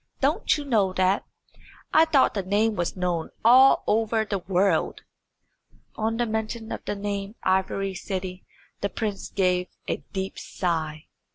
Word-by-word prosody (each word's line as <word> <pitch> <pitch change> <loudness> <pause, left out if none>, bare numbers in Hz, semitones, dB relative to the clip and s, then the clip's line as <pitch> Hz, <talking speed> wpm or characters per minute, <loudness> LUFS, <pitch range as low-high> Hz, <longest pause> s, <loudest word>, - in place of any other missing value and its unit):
Don't 305 - +2
you 295 - -6
know 210 -8 +2
that? 185 +1 +2 0.7
I 320 +1 +7
thought 300 -5 +3
the 200 - -1
name 210 +4 +1
was 175 0 -2
known 175 -3 -1 0.2
all 260 +3 +7
over 220 +1 +1
the 200 -2 -2
world." 190 +2 +1 0.9
On 225 +1 -1
the 240 - +1
mention 220 0 -3
of - - -5
the - - -2
name 200 +1 -4
Ivory 190 +1 0
City 185 -1 -5 0.4
the 200 - -1
prince 205 -3 -4
gave 180 -2 +1 0.2
a - - -1
deep 190 -1 -4
sigh. 160 -3 -3
200 Hz, 150 wpm, -25 LUFS, 185-225 Hz, 0.9 s, I